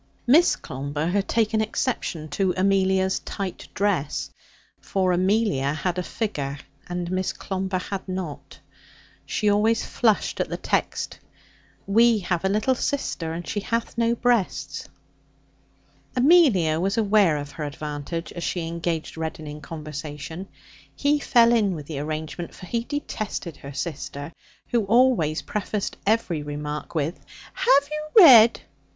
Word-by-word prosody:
Miss 305 +8 +5
Clomber 145 +3 -4
had 200 +2 0
taken 220 -1 +1
exception 215 -8 -2
to 190 +2 0
Amelia's 190 0 +2
tight 195 -2 -6
dress. 185 -8 -1 0.5
For 185 -2 0
Amelia 185 -6 +1
had 175 +3 -2
a - - +1
figure, 145 -9 -3 0.3
and 175 0 -3
Miss 185 0 0
Clomber 190 -1 -3
had 190 +1 -5
not. 185 -6 -6 0.7
She 210 - -1
always 215 +2 +3
flushed 220 -4 +1
at - - -1
the - - -3
text, - - -2 0.7
'We 230 +3 +5
have 175 -1 -1
a 190 - +2
little 215 +6 +2
sister, 245 - -2
and 170 +1 -6
she 210 - -2
hath 230 +3 -2
no 235 0 +2
breasts.' 235 -5 0 1.3
Amelia 250 - +5
was 195 +5 0
aware 205 -7 +4
of 145 0 -6
her 155 - -6
advantage 150 +3 -5
as 175 - -6
she 175 -1 -2
engaged 165 -1 -3
Reddin 160 -1 -4
in 150 0 -8
conversation. 155 +3 -7 0.5
He 290 +1 +2
fell 235 -4 +4
in 205 -5 +2
with 150 -3 -7
the 145 -2 -5
arrangement, 155 +3 -5
for - - -10
he 230 +5 -2
detested 215 - -4
her 140 +1 -9
sister, 145 0 -5 0.4
who 235 -2 +2
always 220 -9 +3
prefaced 210 0 -3
every 200 -8 +1
remark 150 +2 -5
with 160 +3 -1 0.3
'Have 285 - +4
you 305 +6 +5
read 235 -7 +8
185 Hz, 140 wpm, -24 LUFS, 155-225 Hz, 1.3 s, read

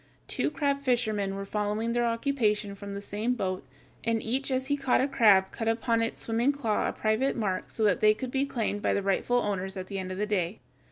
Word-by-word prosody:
Two - - 0
crab 280 -2 0
fishermen 215 -7 0
were 195 0 -4
following 210 +3 -1
their 240 0 +1
occupation 230 -4 0
from 200 0 -7
the 200 - -5
same 215 +5 -2
boat, 185 -5 -2 0.4
and 230 0 +1
each 260 +5 0
as 260 0 0
he 285 +1 +1
caught 270 -3 +2
a 265 - +2
crab 200 -8 +5
cut 225 - -4
upon 230 0 +1
its 230 - -2
swimming 235 +4 +2
claw 235 -7 0
a - - -1
private 220 +5 0
mark 195 -5 -2
so 220 - -2
that 205 -3 +3
they 215 0 +5
could 250 +3 -5
be 270 +1 +1
claimed 225 -6 -2
by - - +1
the 200 - 0
rightful 200 +5 +1
owners 195 -4 -2
at 185 - -4
the 195 0 -5
end 185 0 -5
of 185 - -5
the 210 - 0
day. 195 -2 -1
220 Hz, 230 wpm, -28 LUFS, 200-245 Hz, 0.4 s, crab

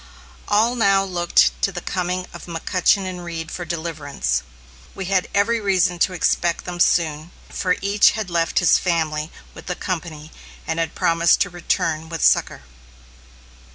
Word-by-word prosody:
All 220 +4 +3
now 195 -4 +3
looked 175 -3 +2
to 195 - +1
the 175 - -5
coming 180 +1 -3
of - - -10
McCutchen 185 +3 +1
and 180 -1 -6
Reed 165 -1 -6
for 175 - -5
deliverance. 155 - -3 0.5
We 195 - -5
had 185 0 +1
every 225 +3 +1
reason 185 -3 +1
to 185 - +2
expect 170 -1 0
them 175 -1 -6
soon, 160 -2 +1 0.2
for 180 -2 0
each 200 +1 +4
had 210 -5 -4
left 165 -1 0
his 175 - +5
family 160 -3 -1 0.2
with - - -13
the 180 - -2
company, 165 -4 -5 0.3
and 160 0 -2
had 165 -1 -2
promised 170 0 +3
to 180 - +1
return 160 -2 -2
with 165 -2 -4
succor. - - +2
175 Hz, 155 wpm, -21 LUFS, 165-185 Hz, 0.5 s, his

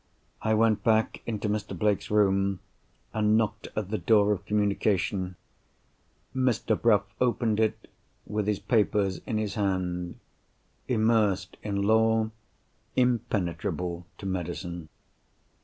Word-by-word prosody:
I 110 0 +2
went 110 -1 +3
back 110 -1 +2
into 110 -2 -2
Mr. 105 -2 -2
Blake's 105 +2 +1
room, 100 -2 +2 0.5
and 110 0 +3
knocked 110 -1 -1
at 105 -2 -3
the 110 - 0
door 105 -2 +4
of 100 - -2
communication. 100 -3 0 1.0
Mr. 125 -4 +1
Bruff 105 -2 +3 0.2
opened 115 -3 +1
it, 110 -1 0 0.4
with 105 0 -2
his 105 -1 +1
papers 105 -5 +1
in 110 - -1
his 105 -2 -2
hand—immersed 95 +2 -1
in 100 -1 -2
Law; 110 +1 +3 0.6
impenetrable 90 -7 -1
to - - -9
Medicine. 85 -2 -4
105 Hz, 110 wpm, -28 LUFS, 95-110 Hz, 1.0 s, door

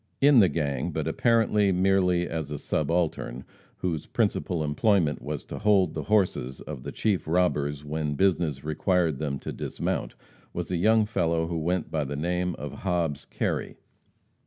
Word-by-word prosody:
In 140 -2 +6
the 95 -4 +6
gang, 70 -4 -1
but 80 -1 -2
apparently 105 +1 +3
merely 90 -1 +2
as 80 -3 -4
a 75 - -4
subaltern, 75 -6 -1 0.3
whose 85 -5 -3
principal 85 -3 0
employment 75 +1 +2
was - - -5
to - - -7
hold 100 -5 +3
the 80 - -3
horses 90 -11 +1
of 75 -4 -7
the - - -6
chief 105 -7 0
robbers 75 -4 +1
when 75 0 -2
business 80 -5 +1
required 80 0 +1
them 70 -3 -2
to - - -6
dismount, - - -3 0.4
was 90 +1 -4
a 90 - +1
young 110 +4 +4
fellow 85 -6 0
who 85 0 -3
went 85 +2 -1
by 75 -2 0
the 70 +1 -4
name 90 +3 -1
of 75 -1 -7
Hobbs 85 -6 -1
Kerry. - - -3
85 Hz, 160 wpm, -27 LUFS, 75-95 Hz, 0.4 s, In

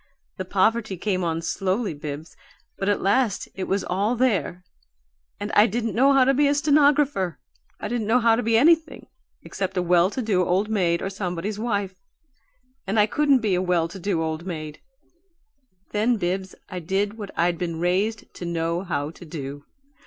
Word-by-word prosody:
The 185 - -4
poverty 200 +2 +1
came 185 0 -1
on 165 -1 -2
slowly, 195 +3 -1
Bibbs, 145 +2 -7 0.4
but 195 - 0
at 205 - 0
last 205 +1 +1
it 190 - -4
was 195 0 -1
all 200 +6 0
there 205 -7 0 0.8
and - - -4
I 210 +2 +6
didn't 230 +1 -2
know 270 +4 +4
how 270 -1 +5
to 270 +2 +3
be 285 +2 +3
a 285 - +2
stenographer. 285 - +3 0.4
I - - -4
didn't 235 -3 -2
know 235 +3 +4
how 230 -1 +4
to 235 - -1
be 230 -1 +2
anything 320 +5 +3 0.4
except 190 -1 -4
a 180 - +2
well 175 +1 +4
to 255 - -4
do 195 -5 +2
old 190 +4 +1
maid 175 -5 +1
or 195 - -3
somebody's 195 +1 -4
wife 200 -5 -2 0.9
and 205 +3 +1
I 210 - +6
couldn't 280 +3 +2
be 210 -4 +1
a 180 - +1
well 180 -3 +1
to 190 +3 -9
do 175 -3 -1
old 160 +1 -3
maid. 155 -4 -6 1.1
Then, 225 +3 +1
Bibbs, 190 0 -3
I 185 -2 -5
did 200 +6 -2
what 205 -2 -6
I'd 170 0 +1
been 170 -2 -3
raised 195 +5 0
to - - -7
know 170 0 -1
how 150 -5 -3
to 170 - -14
do. 145 -3 -7
195 Hz, 185 wpm, -24 LUFS, 175-225 Hz, 1.1 s, I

